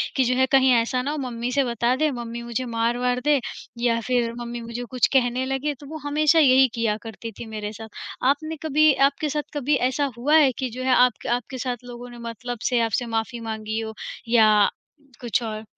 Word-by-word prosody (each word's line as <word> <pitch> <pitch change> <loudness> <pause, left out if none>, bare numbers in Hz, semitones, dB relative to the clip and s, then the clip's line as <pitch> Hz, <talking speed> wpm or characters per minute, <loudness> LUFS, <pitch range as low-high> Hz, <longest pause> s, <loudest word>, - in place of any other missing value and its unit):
कि 265 - +3
जो 250 +1 +1
है 260 +1 +4
कहीं 265 -1 +5
ऐसा 240 +2 +1
ना 280 +3 -2
हो 305 - -3
मम्मी 245 -3 -3
से 275 +2 +2
बता 240 0 0
दे, 305 +3 +1
मम्मी 235 -2 -6
मुझे 235 +2 -3
मार-वार 240 +2 0
दे 295 -1 +4 0.4
या 235 -1 +2
फिर 240 -2 +1
मम्मी 240 0 -5
मुझे 235 +1 -6
कुछ 255 -2 +3
कहने 255 -1 +2
लगें, 270 +3 -1
तो 280 +1 -13
वो 315 - -6
हमेशा 305 +2 +3
यही 265 -3 +6
किया 225 -2 0
करती 225 0 -7
थी - - -6
मेरे 210 -1 -4
साथ, 220 +1 -9 0.4
आपने 310 +3 -1
कभी 310 0 +4 0.2
आपके 295 +2 -4
साथ 295 +1 -1
कभी 290 0 +1
ऐसा 280 +2 -1
हुआ 290 +6 +2
है 285 -4 +5
कि 260 - -1
जो 255 +2 -6
है 260 -1 +3
आपक 250 -2 +3
आपके 255 +2 -8
साथ 245 -1 -3
लोगों 245 0 -9
ने 240 - -11
मतलब 245 +1 -6
से 245 -2 +2
आपसे 230 +2 0
माफ़ी 225 +2 -3
माँगी 220 0 -3
हो 220 0 -5 0.4
या 215 -3 +5 0.5
कुछ 240 0 0
और? 215 -1 -5
245 Hz, 215 wpm, -24 LUFS, 230-270 Hz, 0.5 s, यही